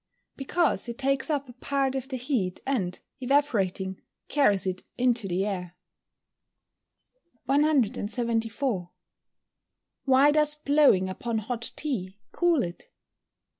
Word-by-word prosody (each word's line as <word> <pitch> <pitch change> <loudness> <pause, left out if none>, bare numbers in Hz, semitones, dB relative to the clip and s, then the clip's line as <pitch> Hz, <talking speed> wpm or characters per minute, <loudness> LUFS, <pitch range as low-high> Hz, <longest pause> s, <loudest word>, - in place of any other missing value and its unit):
_ - - -57
Because 285 -1 0
it 235 - -6
takes 275 +2 0
up 285 -3 -1
a 245 - -12
part 270 +1 -1
of 265 -1 -4
the 260 - -3
heat, 240 -8 -2
and, 195 -10 -2 0.2
evaporating, 220 -9 0 0.3
carries 210 -10 +3
it 185 -1 -2 0.2
into 245 -4 +2
the 185 +2 -1
air. 180 -4 -4 1.7
174. 235 - 0 1.2
_Why 270 +2 +5
does 300 -1 +7
blowing 285 -10 +3
upon 225 +5 -3
hot 230 +2 -3
tea 205 -11 -4
cool 345 -7 +2
it? 175 0 -8
245 Hz, 115 wpm, -27 LUFS, 195-280 Hz, 1.7 s, does